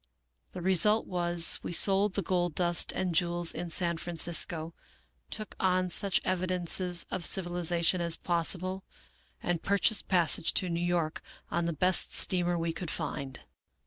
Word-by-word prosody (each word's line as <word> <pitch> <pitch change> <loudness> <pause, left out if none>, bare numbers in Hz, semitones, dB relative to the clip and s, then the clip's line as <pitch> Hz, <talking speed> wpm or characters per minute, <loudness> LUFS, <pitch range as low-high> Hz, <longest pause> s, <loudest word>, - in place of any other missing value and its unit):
The 180 - -7
re 190 +1 +2
sult 210 +5 +3
was, 175 -2 +2
we - - -6
sold 195 +2 +4
the 200 - -2
gold 175 -2 -1
dust 175 -1 0
and 185 -2 -3
jewels 175 0 0
in 175 - -6
San 170 0 0
Francisco, 165 -1 0 0.6
took 215 -2 0
on 185 -1 +1
such 195 +1 +2
evidences 180 -1 0
of 185 - -3
civilization 175 -1 +1
as 170 -1 +2
possible, 185 +2 -2 0.6
and 175 -2 -2
pur 200 +1 0
chased 220 +2 +1
passage 170 -3 +1
to 185 - +3
New 170 0 -2
York 170 -3 -2 0.3
on 170 0 -1
the 170 - -1
best 180 +4 0
steamer 175 -1 +2
we 165 0 -2
could 175 -1 -6
find. 135 -2 -5
175 Hz, 155 wpm, -29 LUFS, 170-185 Hz, 0.6 s, sold